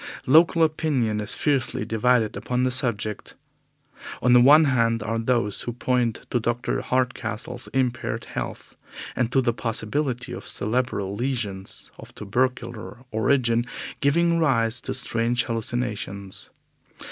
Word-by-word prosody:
Local 165 Hz, +4 st, +5 dB
opinion 140 Hz, -9 st, 0 dB
is 105 Hz, -, +1 dB
fiercely 135 Hz, -7 st, 0 dB
divided 115 Hz, 0 st, +2 dB
upon 125 Hz, 0 st, -1 dB
the 130 Hz, -, +1 dB
subject. 115 Hz, -4 st, -1 dB, 0.8 s
On 125 Hz, -, +3 dB
the 125 Hz, -, +8 dB
one 150 Hz, +5 st, +8 dB
hand 115 Hz, -5 st, +2 dB
are 115 Hz, +1 st, -2 dB
those 115 Hz, -3 st, 0 dB
who 120 Hz, -, -4 dB
point 125 Hz, -2 st, -1 dB
to 120 Hz, -, +2 dB
Dr. 120 Hz, +1 st, -1 dB
Hardcastle's 125 Hz, -4 st, -2 dB
impaired 125 Hz, -2 st, -1 dB
health, -, -, -6 dB, 0.4 s
and 120 Hz, -2 st, 0 dB
to 135 Hz, -, +3 dB
the 120 Hz, -2 st, +1 dB
possibility 120 Hz, +3 st, -2 dB
of -, -, -7 dB
cerebral 110 Hz, -4 st, -1 dB
lesions 105 Hz, -5 st, -2 dB
of -, -, -13 dB
tubercular 120 Hz, +2 st, -3 dB
origin 120 Hz, +1 st, +2 dB, 0.3 s
giving 170 Hz, +4 st, +2 dB
rise 120 Hz, -6 st, +2 dB
to -, -, -3 dB
strange 120 Hz, +1 st, +1 dB
hallucinations. 110 Hz, -4 st, -3 dB
120 Hz, 125 wpm, -24 LUFS, 115-130 Hz, 0.8 s, the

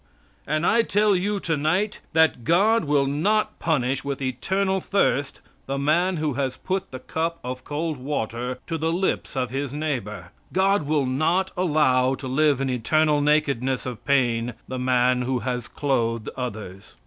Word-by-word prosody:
And 155 Hz, +2 st, 0 dB
I 230 Hz, -, +4 dB
tell 210 Hz, -2 st, +2 dB
you 200 Hz, +3 st, 0 dB
tonight 170 Hz, +6 st, 0 dB
that 160 Hz, -6 st, +3 dB
God 200 Hz, -, +3 dB
will 145 Hz, -1 st, +2 dB
not 190 Hz, +10 st, 0 dB
punish 135 Hz, -4 st, 0 dB
with 140 Hz, -1 st, -3 dB
eternal 190 Hz, +10 st, 0 dB
thirst 145 Hz, -9 st, 0 dB, 0.3 s
the 135 Hz, +1 st, -2 dB
man 170 Hz, +6 st, +2 dB
who 155 Hz, -2 st, -1 dB
has 135 Hz, -1 st, -2 dB
put 190 Hz, 0 st, -3 dB
the 130 Hz, -, -7 dB
cup 165 Hz, +5 st, -3 dB
of 125 Hz, +1 st, -5 dB
cold 155 Hz, +1 st, -3 dB
water 125 Hz, -2 st, -3 dB
to 165 Hz, -1 st, -3 dB
the 160 Hz, +2 st, 0 dB
lips 180 Hz, -1 st, -1 dB
of 125 Hz, -2 st, -1 dB
his 135 Hz, 0 st, -3 dB
neighbor. 120 Hz, -, -4 dB, 0.2 s
God 190 Hz, -4 st, +2 dB
will 150 Hz, -2 st, +1 dB
not 165 Hz, +9 st, +1 dB
allow 140 Hz, -7 st, +2 dB
to 130 Hz, -, -7 dB
live 140 Hz, +1 st, +2 dB
in 135 Hz, -, -1 dB
eternal 150 Hz, +5 st, +2 dB
nakedness 140 Hz, -4 st, +1 dB
of 125 Hz, -3 st, -6 dB
pain 120 Hz, -4 st, +1 dB
the 130 Hz, -, -4 dB
man 125 Hz, 0 st, +2 dB
who 130 Hz, +1 st, 0 dB
has 125 Hz, -1 st, -2 dB
clothed 115 Hz, -6 st, -1 dB
others. 105 Hz, -6 st, -7 dB
145 Hz, 160 wpm, -24 LUFS, 125-165 Hz, 0.3 s, I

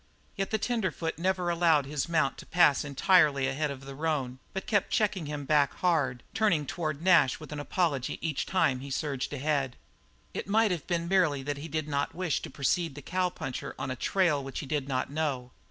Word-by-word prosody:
Yet 195 Hz, 0 st, -2 dB
the 220 Hz, -, +1 dB
tenderfoot 195 Hz, -8 st, -2 dB
never 180 Hz, -1 st, +1 dB
allowed 165 Hz, -4 st, +3 dB
his 145 Hz, +3 st, -3 dB
mount 160 Hz, -5 st, +1 dB
to -, -, -11 dB
pass 170 Hz, -5 st, +4 dB
entirely 145 Hz, -1 st, +3 dB
ahead 145 Hz, +3 st, -1 dB
of 135 Hz, -1 st, -7 dB
the 135 Hz, -, -7 dB
roan, 135 Hz, -4 st, -2 dB
but 190 Hz, -, -4 dB
kept 205 Hz, -3 st, +1 dB
checking 195 Hz, -7 st, 0 dB
him 145 Hz, -1 st, -4 dB
back 145 Hz, 0 st, +3 dB
hard, 145 Hz, -9 st, +1 dB
turning 175 Hz, -9 st, +2 dB
toward 155 Hz, 0 st, -3 dB
Nash 175 Hz, -9 st, +5 dB
with 155 Hz, -, -10 dB
an 150 Hz, -, -4 dB
apology 145 Hz, -4 st, -1 dB
each 155 Hz, -4 st, -2 dB
time 140 Hz, -9 st, +2 dB
he 140 Hz, +2 st, -8 dB
surged 140 Hz, -1 st, -2 dB
ahead. 140 Hz, -2 st, -1 dB, 0.6 s
It -, -, -4 dB
might 215 Hz, +1 st, +3 dB
have 175 Hz, -4 st, -3 dB
been 170 Hz, -1 st, -1 dB
merely 170 Hz, -7 st, +2 dB
that 145 Hz, +1 st, -3 dB
he 145 Hz, +3 st, -6 dB
did 155 Hz, -1 st, -2 dB
not 140 Hz, -1 st, -1 dB
wish 180 Hz, -3 st, -1 dB
to -, -, -7 dB
precede 160 Hz, +2 st, 0 dB
the 145 Hz, -, -9 dB
cowpuncher 180 Hz, -7 st, -3 dB
on 130 Hz, -, -3 dB
a -, -, -2 dB
trail 155 Hz, 0 st, +1 dB
which 135 Hz, 0 st, -7 dB
he -, -, -3 dB
did 140 Hz, -1 st, -2 dB
not 130 Hz, 0 st, -1 dB
know. 140 Hz, -5 st, -2 dB
150 Hz, 205 wpm, -29 LUFS, 140-175 Hz, 0.6 s, Nash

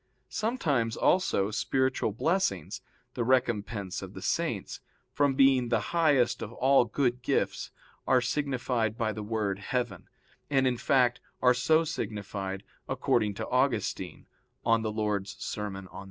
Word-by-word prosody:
Sometimes 145 Hz, -, 0 dB
also 110 Hz, -, +2 dB
spiritual 130 Hz, +1 st, 0 dB
blessings, 115 Hz, -, -1 dB, 0.3 s
the 120 Hz, -, -1 dB
recompense 115 Hz, -6 st, 0 dB
of -, -, -9 dB
the -, -, -7 dB
Saints, -, -, -2 dB, 0.3 s
from 140 Hz, -2 st, +2 dB
being 135 Hz, -3 st, +4 dB
the 115 Hz, -2 st, 0 dB
highest 150 Hz, -8 st, +3 dB
of 110 Hz, -, -5 dB
all 135 Hz, 0 st, +4 dB
good 125 Hz, +1 st, 0 dB
gifts, 120 Hz, -, -1 dB, 0.4 s
are 130 Hz, -, +5 dB
signified 125 Hz, -4 st, -1 dB
by 110 Hz, -3 st, 0 dB
the 110 Hz, -, -5 dB
word 105 Hz, -2 st, -2 dB
heaven, 120 Hz, +4 st, -3 dB, 0.4 s
and, 135 Hz, -2 st, +3 dB
in 125 Hz, -2 st, +1 dB
fact, 125 Hz, -1 st, +2 dB, 0.2 s
are 125 Hz, 0 st, +5 dB
so 155 Hz, +6 st, +3 dB
signified, 100 Hz, -8 st, -4 dB, 0.3 s
according 105 Hz, -2 st, +1 dB
to -, -, -4 dB
Augustine 120 Hz, -8 st, -1 dB, 0.4 s
(De -, -, +2 dB, 0.2 s
Serm. 105 Hz, -1 st, -3 dB
Dom. -, -, -15 dB
120 Hz, 130 wpm, -29 LUFS, 105-135 Hz, 0.4 s, are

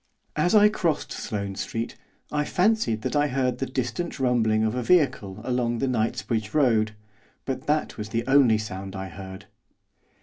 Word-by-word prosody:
As 175 Hz, +7 st, +2 dB
I 210 Hz, 0 st, +8 dB
crossed 175 Hz, -7 st, -1 dB
Sloane 100 Hz, -3 st, -4 dB
Street, 115 Hz, +4 st, -4 dB, 0.4 s
I 150 Hz, 0 st, +1 dB
fancied 180 Hz, -, +1 dB
that -, -, -2 dB
I 145 Hz, 0 st, +3 dB
heard 130 Hz, -2 st, 0 dB
the 135 Hz, -, -1 dB
distant 130 Hz, +7 st, -3 dB
rumbling 115 Hz, -4 st, +2 dB
of 110 Hz, 0 st, +1 dB
a 125 Hz, -, -1 dB
vehicle 115 Hz, -, +2 dB
along 120 Hz, -1 st, 0 dB
the 135 Hz, -, 0 dB
Knightsbridge 115 Hz, -2 st, -1 dB
Road, 115 Hz, -7 st, +3 dB, 0.5 s
but 130 Hz, -1 st, -4 dB
that 150 Hz, +1 st, 0 dB
was 105 Hz, 0 st, -5 dB
the 115 Hz, +1 st, -1 dB
only 135 Hz, -5 st, +5 dB
sound 100 Hz, -2 st, -6 dB
I 95 Hz, 0 st, -5 dB
heard. 95 Hz, +2 st, -9 dB
120 Hz, 165 wpm, -25 LUFS, 110-140 Hz, 0.5 s, I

